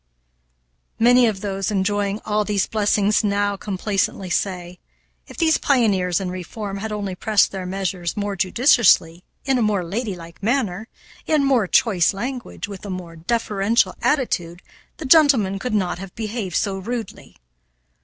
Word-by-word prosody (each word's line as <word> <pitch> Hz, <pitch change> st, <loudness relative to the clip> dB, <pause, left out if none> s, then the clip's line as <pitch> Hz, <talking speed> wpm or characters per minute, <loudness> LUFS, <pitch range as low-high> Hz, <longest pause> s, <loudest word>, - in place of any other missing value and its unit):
Many 245 Hz, +1 st, +5 dB
of 200 Hz, -3 st, -2 dB
those 195 Hz, -2 st, -2 dB
enjoying 205 Hz, +1 st, -1 dB
all 210 Hz, 0 st, +1 dB
these 205 Hz, -2 st, 0 dB
blessings 210 Hz, 0 st, +1 dB
now 205 Hz, 0 st, 0 dB
complacently 195 Hz, -1 st, -2 dB
say, 180 Hz, -2 st, -2 dB, 0.5 s
"If -, -, -13 dB
these 320 Hz, -2 st, +3 dB
pioneers 195 Hz, -, +2 dB
in 185 Hz, -2 st, -4 dB
reform 195 Hz, +3 st, -6 dB
had 215 Hz, +2 st, -5 dB
only 205 Hz, -2 st, -3 dB
pressed 210 Hz, +2 st, +2 dB
their 190 Hz, -2 st, -5 dB
measures 185 Hz, -2 st, -3 dB
more 205 Hz, -1 st, -2 dB
judiciously, 185 Hz, -, +3 dB, 0.2 s
in 265 Hz, -2 st, +2 dB
a -, -, +1 dB
more 210 Hz, -4 st, +1 dB
ladylike 175 Hz, -3 st, -5 dB
manner, 220 Hz, -3 st, -1 dB, 0.4 s
in 305 Hz, -2 st, +2 dB
more 260 Hz, -7 st, +2 dB
choice 195 Hz, -4 st, +2 dB
language, 245 Hz, +1 st, -5 dB
with 200 Hz, -2 st, -9 dB
a 205 Hz, -, -7 dB
more 180 Hz, -3 st, -6 dB
deferential 210 Hz, +4 st, 0 dB
attitude, 180 Hz, -, -1 dB, 0.3 s
the 315 Hz, -, -7 dB
gentlemen 260 Hz, -, +4 dB
could 250 Hz, 0 st, -2 dB
not 180 Hz, -4 st, -1 dB
have 195 Hz, -1 st, -9 dB
behaved 215 Hz, -5 st, -4 dB
so 195 Hz, -2 st, 0 dB
rudely." 230 Hz, +3 st, -6 dB
205 Hz, 145 wpm, -21 LUFS, 185-225 Hz, 0.5 s, Many